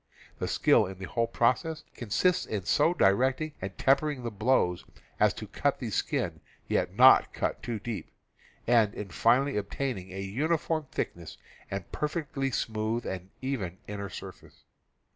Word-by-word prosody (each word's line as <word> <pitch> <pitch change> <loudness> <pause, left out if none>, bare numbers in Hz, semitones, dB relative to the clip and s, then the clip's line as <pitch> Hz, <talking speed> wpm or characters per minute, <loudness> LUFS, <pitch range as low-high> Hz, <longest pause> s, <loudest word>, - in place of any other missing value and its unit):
The - - -1
skill - - +4
in 95 0 -8
the 95 - -6
whole 115 +2 0
process 150 +7 +1
consists 180 - +1
in 100 -4 -3
so 150 +3 +3
directing 130 - +2
and 95 -1 -5
tempering 140 -1 +2
the 115 - -3
blows 105 -5 +1 0.4
as - - +5
to - - -6
cut - - 0
the - - -5
skin, - - -1 0.3
yet 90 - 0
not 130 +3 +7
cut - - -2
too 120 -2 -3
deep, 110 0 -5 0.6
and 115 -4 +3
in 105 - -6
finally 125 +7 +3
obtaining 100 -2 -3
a 95 +1 -5
uniform 155 - -1
thickness 85 -2 -5 0.3
and 100 -2 -5
perfectly 150 -3 -2
smoothe 115 -1 -2
and 95 0 -5
even 105 -10 -3
inner 100 -1 -5
surface. - - -11
115 Hz, 150 wpm, -29 LUFS, 100-140 Hz, 0.6 s, not